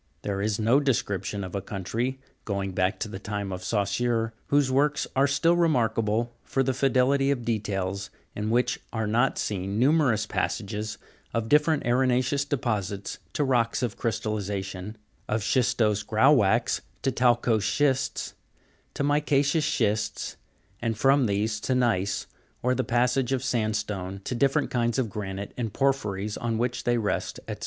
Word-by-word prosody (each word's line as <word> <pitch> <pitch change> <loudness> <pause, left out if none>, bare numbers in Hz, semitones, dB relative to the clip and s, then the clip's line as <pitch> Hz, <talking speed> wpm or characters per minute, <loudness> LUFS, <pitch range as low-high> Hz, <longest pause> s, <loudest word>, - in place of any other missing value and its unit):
There 100 -1 -2
is 105 0 0
no 115 +5 +4
description 100 -7 -1
of 95 - -7
a 100 - -2
country, 115 +7 -3 0.2
going 100 -2 -2
back 95 +2 0
to - - -1
the 100 -2 -7
time 100 -1 -4
of 90 0 -5
Saussure, 115 +3 0
whose 140 -2 +3
works 145 +3 +2
are 135 +1 +4
still 165 +4 +3
remarkable 115 -8 +1
for 135 - 0
their 130 0 0
fidelity 135 +1 +2
of 125 -4 -1
details, 100 -4 -2 0.3
in 105 +1 -2
which 120 +2 +1
are 110 -1 -1
not 120 +5 +2
seen 100 0 -2
numerous 130 -4 +3
passages 105 0 -3 0.4
of 115 -1 -1
different 150 0 +3
arena'ceous 130 +3 +1
deposits 105 -7 -2
to 150 - +1
rocks 120 -3 +1
of 120 -2 -1
crystallization, 105 -3 -3 0.3
of 110 -1 0
schistose 110 -5 +2
grauwackes 110 -2 +3 0.2
to 135 - +2
talcose 120 -2 +3
schists, 135 +3 0 0.6
to - - -1
mica'ceous 145 +1 +2
schists, 105 -3 -1 0.5
and 115 -2 -1
from 135 +1 +4
these 105 +2 0
to 130 +4 -1
gneiss, 105 -5 +1 0.4
or 125 +1 +3
the 130 +1 0
passage 125 +2 +1
of 130 -1 0
sandstone 105 -5 -2
to - - -3
different 135 +3 +1
kinds 120 -1 +1
of 120 -6 0
granite 100 -2 -5
and 115 -5 -3
porphyries 110 -7 0
on 115 -1 -1
which 120 +1 -2
they 120 0 +2
rest, 105 -3 -2
&c. - - -3
115 Hz, 150 wpm, -26 LUFS, 105-130 Hz, 0.6 s, no